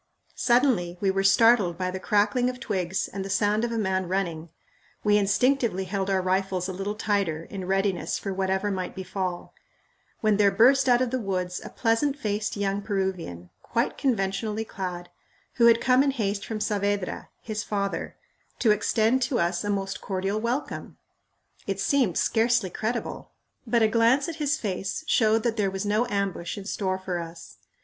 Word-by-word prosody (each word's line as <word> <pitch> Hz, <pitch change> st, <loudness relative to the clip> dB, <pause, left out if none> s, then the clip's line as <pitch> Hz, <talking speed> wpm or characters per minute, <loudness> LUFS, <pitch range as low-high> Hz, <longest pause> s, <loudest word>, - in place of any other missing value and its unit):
Suddenly, 240 Hz, -9 st, +2 dB
we 195 Hz, 0 st, +2 dB
were 195 Hz, 0 st, 0 dB
startled 200 Hz, -3 st, +4 dB
by 185 Hz, 0 st, -2 dB
the 190 Hz, -, -5 dB
crackling 210 Hz, +5 st, +2 dB
of 250 Hz, 0 st, -6 dB
twigs 190 Hz, -6 st, -2 dB
and 195 Hz, 0 st, -5 dB
the 195 Hz, -, -6 dB
sound 210 Hz, +2 st, +1 dB
of 240 Hz, -, -1 dB
a 230 Hz, -, -2 dB
man 190 Hz, -3 st, 0 dB
running. 170 Hz, -3 st, -2 dB, 0.5 s
We 210 Hz, -1 st, +4 dB
instinctively 210 Hz, 0 st, +2 dB
held 190 Hz, +1 st, -2 dB
our 190 Hz, -1 st, +1 dB
rifles 185 Hz, -1 st, 0 dB
a 190 Hz, -, -4 dB
little 195 Hz, +3 st, -3 dB
tighter 200 Hz, -7 st, -1 dB
in 190 Hz, +1 st, -7 dB
readiness 195 Hz, -1 st, 0 dB
for 195 Hz, -, -4 dB
whatever 190 Hz, +2 st, 0 dB
might 185 Hz, -2 st, -4 dB
befall 185 Hz, -1 st, -4 dB, 0.7 s
when 215 Hz, -2 st, +3 dB
there 205 Hz, -1 st, +5 dB
burst 255 Hz, +7 st, +4 dB
out 245 Hz, +1 st, +5 dB
of 245 Hz, -, -2 dB
the 260 Hz, -, 0 dB
woods 185 Hz, -4 st, -2 dB
a -, -, -7 dB
pleasant 250 Hz, +5 st, +1 dB
faced 210 Hz, -5 st, -2 dB
young 200 Hz, 0 st, -1 dB
Peruvian, 185 Hz, -, -3 dB
quite 235 Hz, +1 st, -1 dB
conventionally 215 Hz, -3 st, -1 dB
clad, 180 Hz, -4 st, -5 dB, 0.5 s
who 235 Hz, -1 st, +6 dB
had 230 Hz, 0 st, +6 dB
come 255 Hz, +1 st, +4 dB
in 280 Hz, -, +3 dB
haste 205 Hz, -6 st, -2 dB
from 220 Hz, -2 st, -3 dB
Saavedra, 205 Hz, -2 st, -1 dB
his 215 Hz, -1 st, -4 dB
father, 200 Hz, -1 st, -3 dB, 0.4 s
to 225 Hz, -, +3 dB
extend 220 Hz, +4 st, +2 dB
to 245 Hz, 0 st, 0 dB
us 170 Hz, +1 st, 0 dB
a 205 Hz, -, -2 dB
most 195 Hz, -1 st, -2 dB
cordial 195 Hz, +2 st, -2 dB
welcome! 245 Hz, +5 st, -3 dB, 0.7 s
It -, -, -2 dB
seemed 260 Hz, -, +2 dB
scarcely 225 Hz, -4 st, +2 dB
credible, 230 Hz, +5 st, -3 dB, 0.4 s
but 230 Hz, 0 st, +3 dB
a -, -, +6 dB
glance 230 Hz, +5 st, +3 dB
at 330 Hz, -2 st, -5 dB
his 300 Hz, 0 st, 0 dB
face 195 Hz, +2 st, -3 dB
showed 225 Hz, -5 st, +3 dB
that 230 Hz, -1 st, 0 dB
there 200 Hz, -2 st, +1 dB
was 195 Hz, +1 st, -4 dB
no 215 Hz, +4 st, +1 dB
ambush 195 Hz, -3 st, -2 dB
in 200 Hz, -, -7 dB
store 190 Hz, -2 st, -1 dB
for 185 Hz, -2 st, -3 dB
us. 170 Hz, 0 st, -9 dB
205 Hz, 175 wpm, -26 LUFS, 190-230 Hz, 0.7 s, who